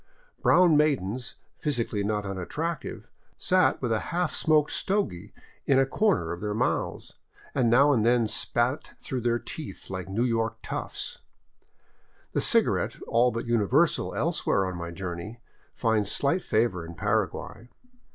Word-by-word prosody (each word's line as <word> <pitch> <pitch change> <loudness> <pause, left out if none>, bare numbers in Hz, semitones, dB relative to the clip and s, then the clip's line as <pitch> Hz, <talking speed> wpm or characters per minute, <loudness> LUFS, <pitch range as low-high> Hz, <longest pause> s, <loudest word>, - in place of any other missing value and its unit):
Brown 175 -4 +5
maidens, 130 -6 0 0.2
physically 115 -8 -1
not 105 0 -1
unattractive, 145 - -4 0.3
sat 185 0 +2
with 120 - 0
a 110 - +2
half 175 -1 0
smoked 155 -2 +2
stogy 195 - -1 0.4
in 135 - +4
a 135 - +5
corner 145 - +1
of 85 - -5
their 105 0 -2
mouths, - - -2 0.4
and 125 -4 +2
now 140 +5 +5
and 115 -5 +2
then 120 -1 +3
spat 120 +6 0
through 130 -4 -4
their 120 0 +1
teeth 150 -3 -8
like 95 0 -5
New 105 +5 0
York 115 -2 0
toughs. - - -5 1.1
The - - 0
cigarette, - - +2
all 120 +2 +4
but 115 -1 -4
universal 120 - +2
elsewhere 160 - +1
on 95 -1 -4
my 85 -1 -5
journey, 90 +5 -6 0.4
finds 110 -4 +1
slight 145 +6 +1
favor 110 -6 +1
in 85 +1 -9
Paraguay. 115 +7 -2
120 Hz, 140 wpm, -27 LUFS, 100-145 Hz, 1.1 s, Brown